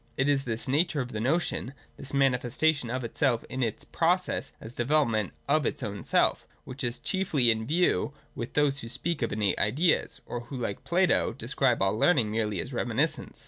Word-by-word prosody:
It 130 - +2
is 140 -1 +2
this 115 +2 -3
nature 150 +3 +1
of 125 -2 -3
the 110 - -4
notion— 135 0 -1 0.2
thiajrTiaiuii£atatiQa.flf.)tafi]fja, 130 -1 0
its 115 -3 -2
process 180 +2 0
as 115 +3 -10
a - - +2
deyeloprnent 115 -7 +2 0.2
of 145 -1 +3
its - - -3
own 100 -1 -5
self, - - +2
— - - -36
which 130 +1 -7
is 120 0 0
chiefly 190 -8 0
iTT 110 0 -5
view 170 0 +2 0.2
with 120 - -6
those 145 -2 +2
who 115 - -7
speak 160 +5 -2
of 115 - 0
innate 105 -2 0
ideas, 150 - +1
or 120 - -4
who, 135 - -8
like 115 -5 -4
Plato, 180 0 +2
describe - - 0
all 95 +1 +2
learning 115 -3 +3
merely 105 -3 -1
as - - -3
reminiscence. - - -1
130 Hz, 180 wpm, -28 LUFS, 115-150 Hz, 0.2 s, of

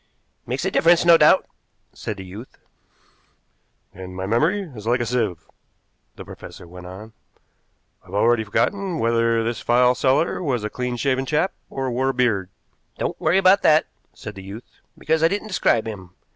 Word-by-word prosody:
"Makes - - -2
a - - 0
difference, 170 +1 +4
no 170 -1 +8
doubt," 150 -2 +5 0.5
said 105 -2 -6
the 95 - -8
youth. 105 +7 -11 1.4
"And 90 0 -9
my 95 0 -4
memory 155 - +1
is 105 0 -9
like 120 +2 +2
a 120 - -1
sieve," 115 -8 -2 0.7
the - - -10
professor - - -11
went 90 +1 -11
on. 105 +5 -10 0.9
"I've 95 - -10
already 115 +2 +3
forgotten 185 - -1
whether 115 -2 +1
this 115 +1 -3
file 125 +1 +4
seller 135 +8 +1
was 130 -9 -1
a 105 - -3
clean 125 -1 -3
shaven 130 +1 0
chap 160 +7 0 0.2
or 135 -1 -3
wore 130 +2 0
a - - 0
beard." 110 -7 +1 0.5
"Don't - - -3
worry 165 +4 +3
about 195 +1 +5
that," 155 0 +4 0.3
said 105 - -9
the 95 - -10
youth, 100 +5 -11 0.2
"because 160 +1 0
I 165 - +6
didn't 205 +4 -3
describe 120 - +1
him. 95 -5 -7
120 Hz, 170 wpm, -22 LUFS, 105-155 Hz, 1.4 s, no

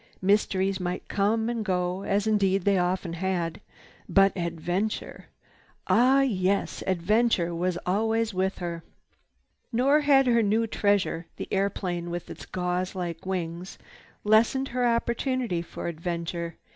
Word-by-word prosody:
Mysteries 195 -1 +2
might 180 0 -4
come 220 +3 +1
and 235 -2 -2
go, 180 -1 -1
as 200 +1 0
indeed 195 -3 +2
they 200 -2 +3
often 180 -1 -1
had, 175 -1 -2 0.5
but 195 -1 +4
adventure! 175 +4 -3 0.6
Ah 260 +4 +4
yes, 200 -6 0
adventure 190 0 +2
was 175 +1 -1
always 220 +3 +1
with 190 +1 -1
her. 170 -2 -5 0.9
Nor 265 +5 +4
had 280 -2 +4
her 235 -2 +4
new 220 +2 +2
treasure, 200 -6 0
the - - -6
airplane 185 -3 -1
with 175 0 -5
its - - -10
gauze 180 +1 -2
like 175 -1 -5
wings, 175 -1 -4 0.5
lessened 230 +6 +3
her 245 0 +1
opportunity 235 -4 0
for 170 - -7
adventure. 170 0 -4
190 Hz, 130 wpm, -27 LUFS, 175-220 Hz, 0.9 s, but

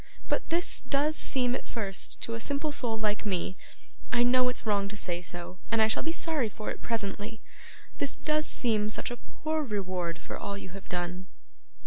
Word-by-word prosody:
but - - 0
this 340 +2 +2
does 280 +4 +2
seem 250 -5 +2
at - - -3
first 200 -5 -3
to 230 - +1
a 230 - -2
simple 285 +5 0
soul 235 -5 0
like 215 -1 +1
me 185 -3 0 0.6
I 240 0 +5
know 250 +1 +5
it's 250 - -4
wrong 200 -2 +3
to 210 +1 -5
say 175 -3 0
so, 175 +1 -6
and 230 - +3
I 220 - +7
shall 220 - +1
be 325 - 0
sorry 320 -8 +1
for 215 +1 -4
it - - -6
presently 220 -1 -2 0.6
this 280 - +2
does 305 0 +2
seem 215 -4 +4
such 215 - 0
a 240 - -3
poor 315 +4 -2
reward 185 - -1
for - - -6
all 200 0 -3
you 195 - -7
have 195 +2 -10
done. 180 +1 -2
220 Hz, 195 wpm, -30 LUFS, 195-255 Hz, 0.6 s, I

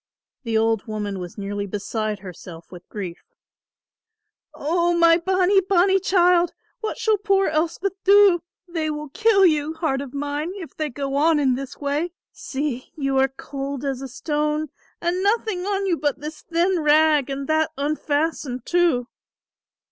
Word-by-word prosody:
The 230 -4 -1
old 225 -1 +1
woman 205 -3 -4
was 180 +2 -8
nearly 200 0 -4
beside 210 +1 -3
herself 175 -3 -11
with 180 -1 -12
grief. 185 -5 -6 1.3
"O 345 +3 +1
my 335 0 +6
bonnie 375 +2 +3
bonnie 380 0 +3
child, 355 -2 +3 0.3
what 440 -2 -4
shall 435 -2 +1
poor 390 -1 +2
Elspeth 340 +5 -2
do? 395 -3 +6 0.3
They 325 -3 -2
will 300 -1 -5
kill 425 +4 +4
you, 310 -2 +2
heart 315 -5 -1
of 280 -3 -7
mine, 290 +4 -3
if 365 -6 -9
they 310 -1 -2
go 275 +1 -4
on 305 +2 +3
in 270 -3 +3
this 270 +1 -5
way. 295 +4 -2 0.2
See 265 -2 -4
you 275 -3 0
are 265 - +4
cold 275 +1 -6
as 270 -2 -2
a 270 - -5
stone 300 +3 -2 0.3
and 350 +2 -1
nothing 405 -2 0
on 400 -1 0
you 355 -3 +1
but 290 -2 -1
this 305 +2 -7
thin 345 +2 +1
rag 300 -2 +4
and 275 0 -3
that 315 0 +2
unfastened 290 -3 -1
too." 345 -9 +2
300 Hz, 155 wpm, -23 LUFS, 270-350 Hz, 1.3 s, my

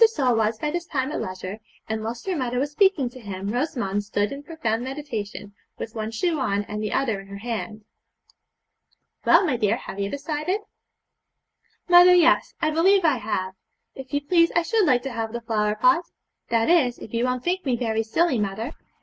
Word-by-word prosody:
Sole 270 - +1
was 220 0 +1
by 300 +5 -2
this 345 +1 -3
time 265 -1 -1
at - - -3
leisure, 185 +2 -6 0.3
and 220 0 -3
whilst 230 +2 -5
her 380 -2 -1
mother 250 -4 -2
was 280 +3 -1
speaking 380 -5 +3
to 255 - -12
him 200 -3 -5
Rosamond 235 -5 -1
stood 205 0 -1
in 280 - -6
profound 285 -8 -2
meditation, 235 -7 -6 0.2
with 225 - -6
one 220 -1 -3
shoe 310 +8 -1
on 205 -6 0
and 210 +1 -5
the 215 - -2
other 230 -7 0
in 195 - -15
her 200 0 -8
hand. 220 -1 -5 1.4
'Well, - - +6
my 275 -8 0
dear, 210 -3 +1
have 195 - -8
you 200 0 -1
decided?' 305 - -2 1.3
'Mother! 355 0 +8
yes, 340 -1 +4
I 310 -1 +1
believe 370 +4 +4
I 300 -5 +4
have. 190 -4 -3 0.4
If 265 -1 -10
you 285 -1 0
please, 335 +3 +3
I 340 - +3
should 430 +1 +2
like 245 -1 +3
to 270 - -4
have 225 -1 -3
the 235 - -4
flower 210 -2 0
pot; 335 +9 +3 0.4
that 230 -1 +2
is, 280 -8 +3
if 220 - -11
you 235 +1 +1
won't 250 0 -1
think 370 +1 -1
me 260 -4 +1
very 225 -2 0
silly, 250 +4 +1
mother.' 210 +7 -3
245 Hz, 200 wpm, -24 LUFS, 215-310 Hz, 1.4 s, Mother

